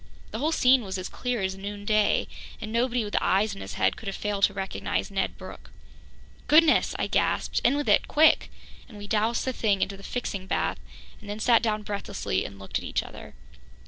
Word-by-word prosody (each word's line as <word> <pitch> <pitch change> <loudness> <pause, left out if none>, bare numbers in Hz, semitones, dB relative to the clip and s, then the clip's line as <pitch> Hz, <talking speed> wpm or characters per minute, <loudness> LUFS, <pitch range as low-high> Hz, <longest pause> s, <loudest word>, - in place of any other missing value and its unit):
The 220 - -4
whole 305 +5 +1
scene 255 -5 +4
was 190 -1 -4
as 185 - -4
clear 245 -5 -3
as 190 0 -1
noonday, 205 +2 0 0.3
and 215 -1 -6
nobody 240 +1 +1
with 205 - -5
eyes 200 +2 +2
in 195 - -9
his - - -7
head - - +2
could 220 - -10
have 195 - -3
failed 205 -1 -3
to 200 - -2
recognize 195 +1 -3
Ned 190 -1 -2
Brooke. - - -11 0.8
"Goodness!" 310 +1 +5
I - - 0
gasped. - - 0
"In 260 +4 +3
with 290 - -2
it - - +4
quick!" 310 +1 +4 0.4
And 215 - -12
we 205 - -8
doused 220 +3 0
the 260 - -1
thing 205 -5 +1
into 195 0 -4
the - - -13
fixing 200 -4 -4
bath - - -1 0.4
and 205 - -12
then 205 +1 -4
sat 230 +1 +4
down 215 -2 -1
breathlessly 200 - -3
and 100 - -8
looked 100 0 -4
at - - -11
each - - -1
other. - - -11
210 Hz, 210 wpm, -26 LUFS, 195-240 Hz, 0.8 s, Goodness